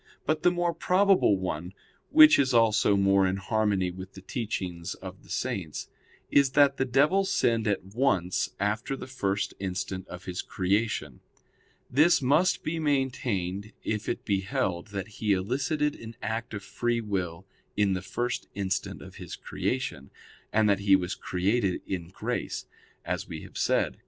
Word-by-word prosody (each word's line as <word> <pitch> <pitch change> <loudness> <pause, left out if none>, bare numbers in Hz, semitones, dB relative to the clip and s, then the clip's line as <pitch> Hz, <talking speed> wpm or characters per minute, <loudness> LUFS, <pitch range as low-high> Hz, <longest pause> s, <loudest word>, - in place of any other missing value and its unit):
But 155 0 +1
the 180 - +5
more 175 -1 0
probable 185 - +3
one, 90 0 -4 0.3
which 310 - +8
is 130 -3 +2
also 110 -3 +4
more 100 -1 +4
in 95 - 0
harmony 100 -2 0
with 95 +1 -9
the 95 - -11
teachings 95 -5 -4
of 95 0 -10
the - - -20
Saints, 85 -6 -3 0.4
is 140 -2 +4
that 140 -1 +5
the 130 - +1
devil 145 +10 +3
sinned 115 - +1
at 100 -3 0
once 95 -4 +1
after 105 +6 -1
the - - -7
first 100 -6 -2
instant 95 0 -4
of 90 +1 -9
his 90 -1 -3
creation. 95 - -1 0.7
This 155 +7 +4
must 150 +7 +2
be 165 +1 -2
maintained 120 - -1
if 105 -1 -2
it - - -3
be 100 -2 +1
held 90 -2 -2
that 100 -2 -5
he 105 -2 +2
elicited 140 - 0
an 115 0 -9
act 115 0 -3
of 100 - -6
free 120 +2 -1
will 95 -5 -3 0.3
in 100 -2 +3
the 90 - -2
first 120 +6 -3
instant 95 -1 -2
of - - -12
his - - -7
creation, - - -3 0.4
and 110 0 +3
that 100 -1 +3
he 100 -1 +5
was 95 0 -1
created 95 +1 0
in 90 -3 -4
grace; 90 - -4 0.4
as - - -2
we - - -7
have - - -13
said - - +2
(Q. - - -26
105 Hz, 165 wpm, -28 LUFS, 95-130 Hz, 0.7 s, which